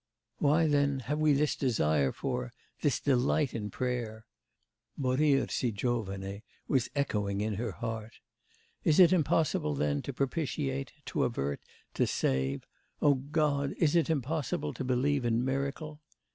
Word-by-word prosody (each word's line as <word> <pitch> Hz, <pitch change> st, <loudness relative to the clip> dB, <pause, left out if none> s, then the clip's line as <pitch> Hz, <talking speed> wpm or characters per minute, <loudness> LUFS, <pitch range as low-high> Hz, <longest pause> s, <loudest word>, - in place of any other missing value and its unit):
Why, 150 Hz, +3 st, +4 dB
then, 140 Hz, -2 st, +2 dB
have 150 Hz, +5 st, -2 dB
we 155 Hz, -1 st, +4 dB
this 145 Hz, +1 st, +2 dB
desire 75 Hz, -, +1 dB
for, 125 Hz, -2 st, -3 dB, 0.3 s
this 145 Hz, -5 st, +2 dB
delight 135 Hz, +1 st, +2 dB
in 105 Hz, -2 st, -3 dB
prayer?' 115 Hz, -1 st, -3 dB, 0.7 s
(Morir 135 Hz, +1 st, +2 dB
si 125 Hz, -, 0 dB
giovane 100 Hz, -3 st, -3 dB, 0.3 s
was 130 Hz, -3 st, +1 dB
echoing 105 Hz, -8 st, 0 dB
in 105 Hz, +1 st, -1 dB
her 110 Hz, 0 st, -3 dB
heart.)... 115 Hz, 0 st, -5 dB, 0.7 s
'Is 155 Hz, -, +3 dB
it 180 Hz, 0 st, +8 dB
impossible, 155 Hz, -, +1 dB
then, 70 Hz, 0 st, 0 dB
to -, -, -5 dB
propitiate, 125 Hz, -, -2 dB
to -, -, -1 dB
avert, 70 Hz, +1 st, -2 dB, 0.3 s
to -, -, +1 dB
save... 65 Hz, +1 st, 0 dB, 0.3 s
O 145 Hz, -, +5 dB
God! 140 Hz, 0 st, 0 dB
is 160 Hz, -1 st, +2 dB
it 170 Hz, -1 st, +3 dB
impossible 140 Hz, -, -1 dB
to -, -, -5 dB
believe 130 Hz, +2 st, +1 dB
in 120 Hz, +1 st, +1 dB
miracle? 140 Hz, +3 st, -3 dB
130 Hz, 140 wpm, -30 LUFS, 105-145 Hz, 0.7 s, it